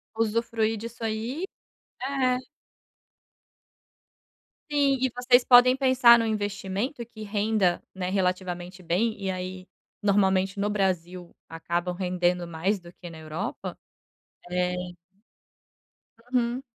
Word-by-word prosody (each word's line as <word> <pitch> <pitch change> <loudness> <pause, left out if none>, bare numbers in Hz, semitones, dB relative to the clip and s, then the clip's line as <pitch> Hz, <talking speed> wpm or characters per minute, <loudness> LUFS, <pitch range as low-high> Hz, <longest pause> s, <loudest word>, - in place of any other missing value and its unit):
Usufruir 225 0 0
disso 230 +2 -8
aí, 225 +9 -3 0.6
é. 260 -2 +1 2.3
Sim 280 -2 +3
e 260 - +2
vocês 245 0 +4
podem 250 +1 +7
pensar 255 -3 +6
no 230 - 0
investimento 205 +4 -3
que 220 -2 -10
renda, 205 -3 +1
né, 185 -1 -3
relativamente 180 -1 -2
bem 205 +7 +1
e 195 -2 -2
aí 185 0 -6 0.4
normalmente 195 -1 +2
no 205 +1 +1
Brasil 180 -3 -2
acabam 175 +2 -3
rendendo 180 -1 0
mais 170 +5 -1
do 175 -1 -13
que 175 -2 -10
na 165 - -11
Europa, 160 +4 -5 0.7
eh 180 0 0 1.6
Uhum. 245 +1 +1
200 Hz, 105 wpm, -26 LUFS, 180-235 Hz, 2.3 s, podem